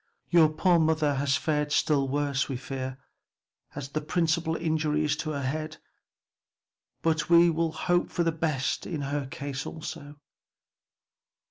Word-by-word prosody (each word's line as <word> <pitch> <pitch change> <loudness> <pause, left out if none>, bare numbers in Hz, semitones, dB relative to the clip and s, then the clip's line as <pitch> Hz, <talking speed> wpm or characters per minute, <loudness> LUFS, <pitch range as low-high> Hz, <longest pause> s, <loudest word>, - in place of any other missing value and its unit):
Your 165 -3 +6
poor 170 +3 +3
mother 155 -2 +2
has 140 0 +1
fared 150 -1 -1
still 145 -2 +2
worse, 140 0 0
we 135 - -2
fear, 130 0 -5 0.8
as 135 -2 -5
the 155 +2 -2
principal 160 0 0
injury 155 -2 0
is 150 0 +1
to 155 - -3
the 140 -2 -3
head, 155 +4 -3 1.3
but 160 -1 +1
we 170 0 +7
will 165 0 0
hope 175 +2 0
for 175 - 0
the 165 - +2
best 155 -4 -1
in 155 -4 -3
her 140 0 -2
case 135 0 -5
also." 150 -2 -8
155 Hz, 145 wpm, -27 LUFS, 140-160 Hz, 1.3 s, we